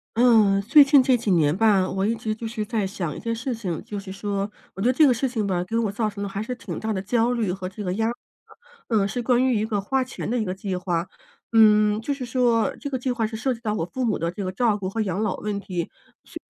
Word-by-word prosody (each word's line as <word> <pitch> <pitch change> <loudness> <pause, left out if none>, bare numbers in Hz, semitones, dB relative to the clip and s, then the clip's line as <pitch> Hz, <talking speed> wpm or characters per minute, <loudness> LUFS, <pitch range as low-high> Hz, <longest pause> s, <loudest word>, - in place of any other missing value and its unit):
嗯， 220 -5 +5
最 290 +7 +7
近 275 -1 +5
这 255 0 +4
几 235 -3 -2
年 155 -4 +3
吧， 200 -3 +3
我 190 +1 -1
一 230 - +1
直 220 -1 -3
就 225 +1 -6
是 220 -1 -4
在 220 -2 -1
想 180 -6 -4
一 - - -7
件 230 -1 -2
事 250 +3 -3
情。 195 -8 -4
就 205 - -5
是 195 -1 -9
说， 200 +1 -3 0.2
我 190 - -7
觉 225 - +2
得 - - +5
这 310 +4 +5
个 255 - +4
事 260 +3 -1
情 225 -4 -2
吧， 180 -3 0
给 225 +5 -3
我 225 -3 0
造 215 +1 -1
成 200 -1 -8
的 - - -2
还 195 +1 -4
是 230 +4 -4
挺 200 -8 -7
大 220 - -3
的 200 - -1
焦 230 +4 +1
虑 230 -6 0
和 185 0 -5
这 205 +2 -8
个 180 -2 -2
压 220 +3 0
力。 235 - -1 0.7
嗯， 210 -4 +2
是 245 +5 -3
关 245 +1 +2
于 255 -2 +2
一 215 - 0
个 215 -2 -1
花 260 +7 0
钱 255 - -6
的 245 - 0
一 - - 0
个 185 -3 -3
计 190 0 -4
划， 180 -1 -2 0.5
嗯， 210 -1 +5
就 285 +5 -2
是 270 -2 -5
说 240 -2 +1
这 285 - -4
个 265 - -2
计 255 +1 -2
划 230 -3 -1
是 220 - -7
涉 260 +4 0
及 230 - -10
到 215 -3 -1
我 165 - -1
父 255 +9 -4
母 225 -4 +1
的 170 0 -2
这 200 +3 -5
个 185 - -3
照 215 +2 +1
顾 190 -2 -4
和 225 - -5
养 195 -1 -1
老 210 -4 -1
问 205 -1 -3
题， 180 -4 -4 0.4
是 - - -9
215 Hz, 310 characters per minute, -24 LUFS, 195-235 Hz, 0.7 s, 最